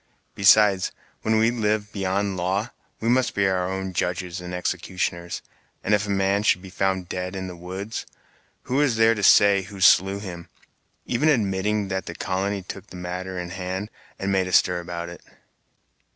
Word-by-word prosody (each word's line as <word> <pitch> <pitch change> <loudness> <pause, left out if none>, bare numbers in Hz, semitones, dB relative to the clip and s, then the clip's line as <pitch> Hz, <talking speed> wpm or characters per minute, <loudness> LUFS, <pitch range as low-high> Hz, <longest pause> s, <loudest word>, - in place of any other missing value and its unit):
Besides, 100 -1 +5 0.3
when 110 0 +2
we 110 +1 +4
live 105 -2 -1
beyond 100 0 -1
law, 95 +5 -1 0.3
we 115 - -3
must 125 +1 +2
be 100 - +2
our 95 -1 +1
own 95 0 -3
judges 90 0 -2
and 90 0 -7
executioners. 90 -1 -3 0.4
And 105 - +1
if 105 0 +2
a - - -6
man 100 0 +2
should 95 -3 +2
be 95 - -10
found 95 -1 -1
dead 90 +2 -4
in 95 0 -4
the 90 -1 -7
woods, 95 +6 -6 0.6
who 135 +3 0
is 140 -6 +2
there 110 +1 +5
to 105 - -4
say 100 0 +6
who 95 +1 -10
slew 95 +1 +5
him, 90 -4 -8 0.6
even 140 +6 +2
admitting 105 -4 +1
that 95 0 -3
the 85 - -6
colony 95 +2 -2
took 95 - -8
the - - -12
matter 90 +1 -5
in 90 -1 -5
hand 95 +3 -4 0.3
and 95 0 -2
made 95 -1 +1
a - - -5
stir 90 -1 +4
about 85 0 -5
it?" 85 0 -10
95 Hz, 180 wpm, -24 LUFS, 90-105 Hz, 0.6 s, say